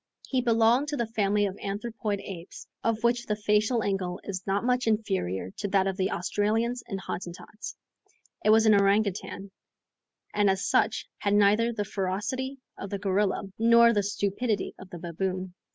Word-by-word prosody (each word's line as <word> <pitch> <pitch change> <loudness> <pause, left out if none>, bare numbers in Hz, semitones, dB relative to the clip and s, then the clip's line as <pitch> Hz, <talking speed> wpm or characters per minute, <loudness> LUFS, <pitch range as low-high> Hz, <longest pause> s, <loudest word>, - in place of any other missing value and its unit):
He 260 -2 +1
belonged 235 +3 +3
to 295 0 -2
the 235 - 0
family 210 -2 +1
of 195 -1 -3
anthropoid 205 0 -3
apes, 180 -3 -9 0.2
of 230 0 0
which 240 0 +1
the 210 - 0
facial 210 +3 +1
angle 190 -2 -2
is 190 -2 -4
not 195 +2 +1
much 250 -1 +1
inferior 190 - -1
to - - -2
that 195 -1 +2
of 195 -1 -1
the 190 0 0
Australians 220 +6 0
and 195 -4 -4
Hottentots. 185 +3 -7 0.7
It - - +3
was 220 +1 +6
an 215 - +6
orangoutang, 200 -1 +1 0.8
and 205 -1 +3
as 195 +1 0
such, 215 - +2
had 200 0 +1
neither 210 +3 +4
the 210 -3 -3
ferocity 210 +9 -3 0.2
of 200 - -5
the 200 - -2
gorilla, 195 0 0 0.2
nor 235 +1 +6
the 205 - +2
stupidity 205 +2 -1
of 190 - -11
the 175 - -8
baboon. 185 +2 -3
205 Hz, 170 wpm, -27 LUFS, 195-225 Hz, 0.8 s, was